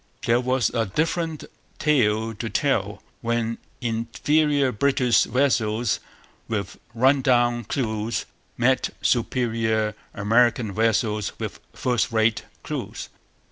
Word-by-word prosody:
There 120 +1 +3
was 130 -2 +1
a 115 -3 0
different 160 - -1 0.3
tale 115 -6 +2
to 110 +2 -5
tell 105 -4 0 0.2
when 115 -1 -1 0.2
inferior 135 +5 +1
British 125 0 +3
vessels 120 -3 +1 0.5
with 100 -3 -4 0.2
'run 135 +4 +4
down' 120 -2 +2
crews 110 -2 -2 0.3
met 130 +2 +2
superior 115 -3 +1 0.2
American 115 +1 +2
vessels 110 -1 +1
with - - -5
first 125 -2 0
rate 110 0 +2 0.2
crews. - - -5
115 Hz, 100 wpm, -24 LUFS, 110-130 Hz, 0.5 s, run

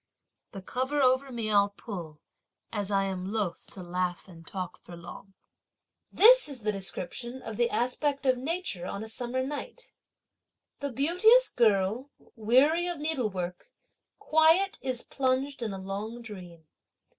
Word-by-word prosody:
The 195 -2 -8
cover 260 +7 -1
over 260 0 +3
me 230 -3 -2
I'll 200 -1 +4
pull, 170 -9 -8 0.5
as 205 -2 -1
I 195 -1 +2
am 190 0 -3
loth 210 -5 -3
to 185 - -8
laugh 180 +1 -3
and 165 -3 -14
talk 185 -2 -5
for 175 - -12
long. 175 +3 -11 0.8
This - - +7
is 265 -4 -4
the 215 0 0
description 200 +5 -4
of 220 - -6
the 235 +2 +2
aspect 275 +4 -1
of 260 -1 +4
nature 265 - -3
on 200 - -5
a - - -7
summer 245 +3 -2
night: 295 - -7 0.9
The 280 -1 -3
beauteous 360 - +5
girl, 220 +3 +2 0.3
weary 265 +10 +3
of 350 -1 -3
needlework, 215 - -3 0.5
quiet 330 +7 +3
is 255 -2 -2
plunged 265 0 -1
in 225 -3 -2
a 195 - -5
long 205 +5 -5
dream. 180 -7 -11
235 Hz, 145 wpm, -28 LUFS, 195-280 Hz, 0.9 s, This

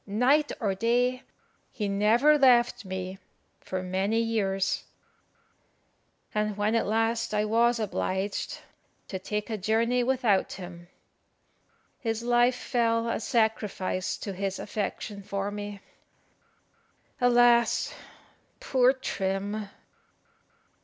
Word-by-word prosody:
Night 260 +9 +2
or 205 -5 0
day, 245 +5 +1 0.5
he 215 -5 -3
never 220 +9 +4
left 245 -6 +4
me 190 0 -5 0.4
for 185 0 -4
many 190 +4 0
years; 195 -4 0 1.5
and 210 -1 -1
when 210 +2 +1
at 230 - +1
last 225 +1 0
I 210 0 +2
was 235 +2 +3
obliged 195 -1 -2 0.5
to 190 - -4
take 210 +4 -4
a 215 - -2
journey 230 +5 +1
without 240 -6 +1
him, 175 -2 -9 1.1
his 225 -1 -2
life 240 +1 +3
fell 230 -2 0
a 230 - -1
sacrifice 215 -5 -1
to 200 - -5
his 195 0 -3
affection 205 0 -4
for 200 +1 -3
me. 205 -1 -6 1.4
Alas, 240 -1 +4 0.7
poor 260 - +3
Trim! 200 -4 -3
215 Hz, 105 wpm, -27 LUFS, 195-240 Hz, 1.5 s, never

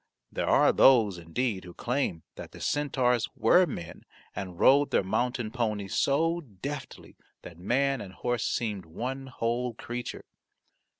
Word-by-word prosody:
There - - -2
are - - +5
those, 110 -9 +5
indeed, 95 +5 -2
who 90 -1 -11
claim 125 - -2
that - - -10
the - - -11
centaurs 130 -5 +1
were 180 0 +5
men 85 - -7 0.3
and 90 -2 -6
rode 140 +2 +5
their - - +2
mountain 120 +3 -1
ponies 105 -5 -2
so 165 +5 +1
deftly 135 - -8 0.3
that 85 -1 -11
man 135 +6 +1
and 95 - -8
horse 120 +2 -1
seemed 105 -7 -2
one 130 +10 -5
whole 120 -1 -2
creature. 120 +1 -6
120 Hz, 140 wpm, -28 LUFS, 100-135 Hz, 0.3 s, are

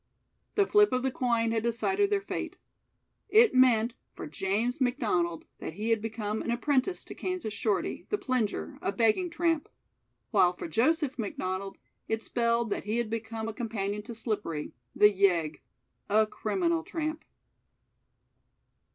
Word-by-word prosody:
The 405 - +4
flip 415 +1 +5
of 255 0 +1
the 265 - +1
coin 235 -3 +1
had 225 -1 +1
decided 380 - +1
their 410 -1 +1
fate. - - -5 0.7
It 450 +2 +6
meant 245 -3 +4 0.2
for - - -6
James 200 - -1
McDonald 210 - 0
that - - -5
he 215 +6 -2
had 225 -2 +2
become 220 -1 -3
an - - -4
apprentice 270 +7 0
to - - -8
Kansas 365 - -3
Shorty, 210 -2 -1
the 415 - +1
Plinger 220 - -2
a - - 0
begging 230 - +2
tramp; 330 -2 0 0.6
while 180 0 +4
for 175 - -6
Joseph 270 - +1
McDonald 195 -2 -3 0.3
it 220 0 -1
spelled 235 -2 0
that - - -2
he 215 +2 -1
had 235 -2 -1
become 225 0 -4
a 225 - -4
companion 210 -3 -3
to 230 +2 -8
Slippery, 205 -9 -3 0.2
the 210 0 +7
Yegg 175 -6 +2 0.5
a 215 +2 +5
criminal 185 -6 0
tramp. 310 - -4
225 Hz, 150 wpm, -29 LUFS, 205-255 Hz, 0.7 s, the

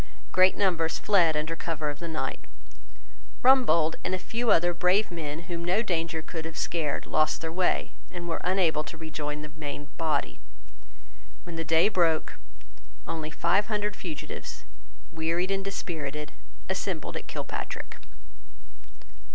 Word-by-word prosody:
Great 185 0 +5
numbers 170 -5 +2
fled 175 -7 +4
under 160 +2 -1
cover 160 -2 -2
of 145 - -10
the 170 - -5
night. 160 -1 -2 1.0
Rumbold 170 -12 +5
and 185 - 0
a - - -1
few 230 +5 -2
other 175 +1 +5
brave 180 +4 +3
men 160 -2 -4
whom 170 0 -4
no 185 +6 +2
danger 165 -5 -1
could 160 -1 -5
have 160 0 -6
scared 160 -4 -1
lost 155 0 +2
their 160 0 -3
way, 180 +2 +1 0.2
and 175 -1 -6
were 165 - -2
unable 180 -5 +2
to 160 - -8
rejoin 150 -2 -4
the 150 - -6
main 145 -1 -6
body. 160 -2 0 1.0
When 175 -1 -7
the 165 - -1
day 165 +2 +5
broke, 170 -6 +2 0.7
only 155 -1 -3
five 195 +6 +2
hundred 210 -2 0
fugitives, 165 -6 -6 0.5
wearied 165 +3 0
and 195 0 0
dispirited, 150 -6 -4 0.4
assembled - - -2
at - - -5
Kilpatrick. - - -5
165 Hz, 145 wpm, -28 LUFS, 155-185 Hz, 1.0 s, Great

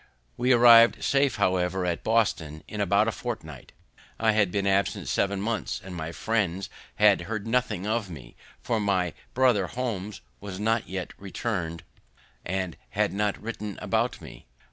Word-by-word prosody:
We 125 +1 +1
arriv'd 120 -1 +7
safe, 140 -1 +2
however, 95 -2 +1
at 85 -2 -2
Boston 90 -9 0
in 105 - -4
about 100 +2 +3
a - - +2
fortnight. 80 - -7 0.5
I 110 -1 +3
had 105 -4 +2
been 100 +1 -1
absent 100 0 +1
seven 100 0 0
months, 110 +3 -2
and 95 - -10
my 80 -1 -4
friends 100 -2 -1 0.2
had 105 -3 +5
heard 110 -2 -3
nothing 115 -5 0
of 110 -2 -1
me; 65 -8 -11 0.3
for 115 -2 0
my 95 -5 0 0.2
br. 125 -6 +4
Holmes 105 -4 -4 0.2
was 100 -1 -7
not 115 +1 0
yet 95 -1 -5
return'd, 90 -5 -4 0.6
and 95 -1 -3
had 105 0 0
not 105 0 -1
written 105 -3 -6
about - - 0
me. - - -12
100 Hz, 155 wpm, -26 LUFS, 90-115 Hz, 0.6 s, arriv'd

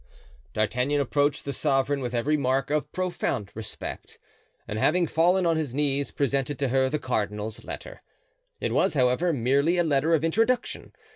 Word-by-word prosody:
D'Artagnan 125 +7 +1
approached 145 +1 +1
the 140 - -3
sovereign 140 0 +1
with 125 -1 -3
every 140 +6 +1
mark 135 -1 0
of 150 0 -1
profound 175 - -2
respect, 110 -1 -7 0.5
and 105 - -3
having 175 +8 +3
fallen 175 +3 +2
on 165 -1 +2
his 145 -6 -3
knees 140 -1 0
presented 140 0 -1
to 135 -1 0
her 130 +1 +2
the 150 - 0
cardinal's 105 -4 -3
letter - - -8 0.6
It - - -2
was, - - +2
however, 130 +7 +2
merely 140 +5 +2
a 175 - +3
letter 155 +1 +2
of 155 - -1
introduction. 225 +9 0
140 Hz, 160 wpm, -26 LUFS, 125-160 Hz, 0.6 s, having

